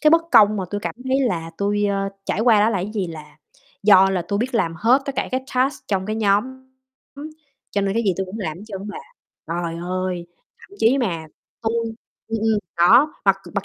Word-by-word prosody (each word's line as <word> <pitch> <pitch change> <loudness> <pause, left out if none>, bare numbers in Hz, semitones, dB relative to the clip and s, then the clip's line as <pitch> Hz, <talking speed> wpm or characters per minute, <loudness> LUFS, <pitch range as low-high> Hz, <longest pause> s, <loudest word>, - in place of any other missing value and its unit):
cái 305 - +5
bất 330 0 +5
công 210 0 +6
mà 190 - -2
tui 205 0 -3
cảm - - -4
thấy 265 +1 +1
là 170 -10 -1
tui, 205 +1 +1
ơ, 195 0 -1 0.2
trải 205 - -1
qua 225 -3 +5
đó 220 +2 +4
là 200 - 0
cái 195 +4 -4
gì 195 -4 -1
là 155 -2 -10 0.5
do 195 -2 +6
là 185 -2 0
tui 200 +4 -2
biết 245 +2 -2
làm 165 -7 +1
hết 240 - +3
tất 275 - -3
cả - - -1
cái 260 +1 -2
task 260 +3 0
trong 190 -2 -1
cái 215 +1 -2
nhóm, 205 0 +3 1.3
cho 200 - 0
nên 195 +1 -1
cái 230 - +1
gì 195 -3 +2
tui 190 - -1
cũng 190 +4 -7
làm 160 -7 -4
hết - - -11
trơn 200 -1 -7
bà. 205 - -6 0.5
Trời 170 0 -3
ơi! 185 -1 -3 0.3
Thậm - - -18
chí 245 +5 +4
mà 170 -10 -2 0.4
tui 225 0 0 0.6
ừm, 225 0 -2
ừm, 220 -1 +2 0.2
đó, 240 - +5
mặc 195 -1 +4 0.2
mặc 200 -1 -1
205 Hz, 225 wpm, -21 LUFS, 185-225 Hz, 1.3 s, công